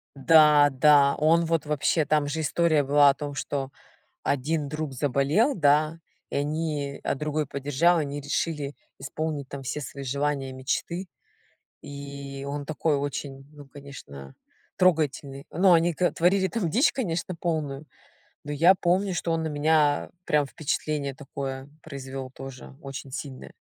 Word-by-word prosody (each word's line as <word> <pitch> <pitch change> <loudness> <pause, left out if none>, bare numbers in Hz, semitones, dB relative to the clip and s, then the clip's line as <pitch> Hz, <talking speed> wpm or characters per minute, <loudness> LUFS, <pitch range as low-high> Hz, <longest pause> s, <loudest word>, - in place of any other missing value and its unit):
Да, 150 0 +6
да. 140 +1 +5
Он 165 +2 +3
вот 165 -2 0
вообще. 150 +1 +1
Там 150 -1 +1
же 155 +3 -3
история 155 -1 +2
была 145 +1 +5
о - - +4
том, 145 0 -6
что 135 -1 -3 0.6
один 145 +2 -1
друг 155 -1 -4
заболел, 145 - +1
да, 155 +1 +2 0.3
и - - -3
они, 145 -1 -2
а - - 0
другой 150 +1 -2
поддержал, 145 +6 +2
они 145 -1 -3
решили 145 0 -2 0.2
исполнить, 145 0 -4
там, 140 -1 -7
все 150 +3 -4
свои 140 0 -7
желания, 140 0 -2
мечты. 170 +8 -3 0.8
И, 140 -1 -8
он 145 0 -4
такой 155 0 0
очень, 140 -1 -5
ну, 145 -1 -12
конечно, 70 - -11 0.4
трогательный. 145 -6 +1
Но 185 +3 +3
они 170 +1 +3
к 180 +3 +1
творили 190 +3 +2
там 205 -8 -1
дичь, 255 - +3
конечно, 180 -7 -3
полную, 155 -4 -3 0.6
но 145 - -6
я 165 +6 +5
помню, 185 +2 +1
что 165 0 -1
он 165 - 0
на - - -1
меня 150 0 +2 0.2
прям 150 -1 +2
впечатление 150 -1 -2
такое 135 -1 -6 0.2
произвёл 135 -3 -7
тоже 135 0 -10
очень 135 -1 -8
сильное. 135 -1 -7
145 Hz, 145 wpm, -26 LUFS, 140-160 Hz, 0.8 s, Да